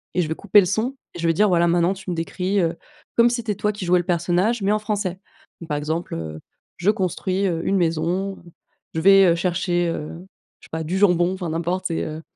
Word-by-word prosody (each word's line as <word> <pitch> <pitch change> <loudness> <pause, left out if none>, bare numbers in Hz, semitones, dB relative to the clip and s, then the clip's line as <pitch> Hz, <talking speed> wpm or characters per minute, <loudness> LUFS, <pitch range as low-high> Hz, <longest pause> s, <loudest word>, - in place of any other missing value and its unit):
et 180 - +3
je - - -3
vais 160 - -1
couper 205 +3 +4
le - - 0
son 220 +8 -1 0.2
et - - -9
je 170 - 0
vais 165 - +3
dire: 210 +6 +3
«Voilà, 170 -1 +3
maintenant 170 +2 +2
tu 190 -1 -9
me 175 - -1
décris, 180 +4 -1
heu, 170 -1 0 0.4
comme 235 0 +6
si 240 - -1
c'était 220 -3 -3
toi 210 +2 0
qui 205 -3 -6
jouais 180 +1 +4
le 175 - -3
personnage 180 +6 +1
mais 200 - +2
en 215 - +1
français». 205 -4 -3 0.4
Donc, 165 - -8
par 150 - 0
exemple, 160 +4 -3
heu: 80 -1 -6 0.4
«Je 180 - +1
construis, 190 0 -1
heu, 165 -3 -1
une 195 - +2
maison, 175 +3 -1 0.5
je 160 - 0
vais, 195 +2 +7
heu, 170 - +4
chercher, 175 0 0
heu, 155 -2 -4 0.5
je - - -17
sais - - -42
pas 160 0 -3
du 175 +5 -2
jambon», 180 -2 +3
enfin 185 -3 -4
n'importe 175 +3 -2
c'est, 165 - -2
heu 155 0 -5
180 Hz, 245 wpm, -22 LUFS, 165-195 Hz, 0.5 s, vais